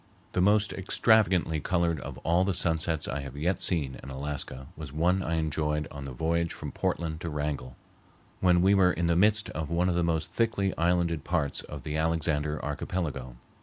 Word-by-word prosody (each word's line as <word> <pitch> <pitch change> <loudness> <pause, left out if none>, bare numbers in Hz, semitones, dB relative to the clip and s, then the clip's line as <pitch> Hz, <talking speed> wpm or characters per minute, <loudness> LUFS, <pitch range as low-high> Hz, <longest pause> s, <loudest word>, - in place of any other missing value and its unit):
The 90 - +1
most 105 +2 +3
extravagantly 95 -5 +2
colored 85 0 0
of - - -7
all 85 +2 +3
the 95 -1 0
sunsets 80 -1 +1
I 70 - -2
have 70 0 -7
yet 90 +6 0
seen 75 -7 0
in - - -9
Alaska 70 -1 -4
was 75 -4 -8
one 90 +5 +2
I 85 -2 -1
enjoyed 75 -1 -1
on 70 -1 -7
the 70 - -6
voyage 85 +5 0
from - - -6
Portland 80 -2 -2
to 85 - -3
Wrangell, 75 -4 -3 0.6
when 90 -1 +4
we 95 +2 +5
were 95 -2 +5
in 85 - -1
the 85 0 +2
midst 105 +3 +3
of 80 -1 -4
one 85 +2 +1
of - - +1
the 85 - +2
most 80 -2 -1
thickly 105 -4 0
islanded 85 -2 +1
parts 75 -3 -1
of 75 -2 -9
the 75 0 -3
Alexander 80 -2 0
Archipelago. 75 -4 -3
80 Hz, 190 wpm, -28 LUFS, 75-90 Hz, 0.6 s, we